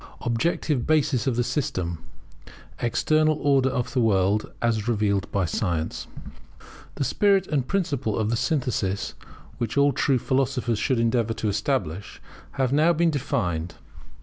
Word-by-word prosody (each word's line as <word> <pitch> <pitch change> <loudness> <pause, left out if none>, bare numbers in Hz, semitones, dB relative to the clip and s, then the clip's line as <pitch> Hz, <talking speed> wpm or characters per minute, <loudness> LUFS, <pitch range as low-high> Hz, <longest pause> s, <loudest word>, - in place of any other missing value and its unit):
[Objective 125 +2 0
basis 150 -6 +2
of 130 - +1
the 120 - +1
system; 95 - -2 0.8
External 155 +6 +2
Order 135 -2 +3
of 130 0 -3
the 130 - +2
World, 100 -1 +2
as 115 -2 0
revealed 100 -5 0
by 100 -2 +1
Science] 85 -2 -2 0.9
The - - -1
spirit 195 - +2
and 150 -6 0
the 125 - -11
principle 145 - -1
of 110 0 0
the - - +2
synthesis 120 - -1 0.5
which 120 +2 -2
all 140 0 +4
true 135 +1 +2
philosophers 130 -3 0
should 130 -3 +1
endeavour 115 -1 +1
to 110 - -1
establish, 100 - -2 0.3
have 130 -1 0
now 155 +4 +4
been 170 +1 +2
defined. 95 - -2
120 Hz, 145 wpm, -25 LUFS, 105-140 Hz, 0.9 s, all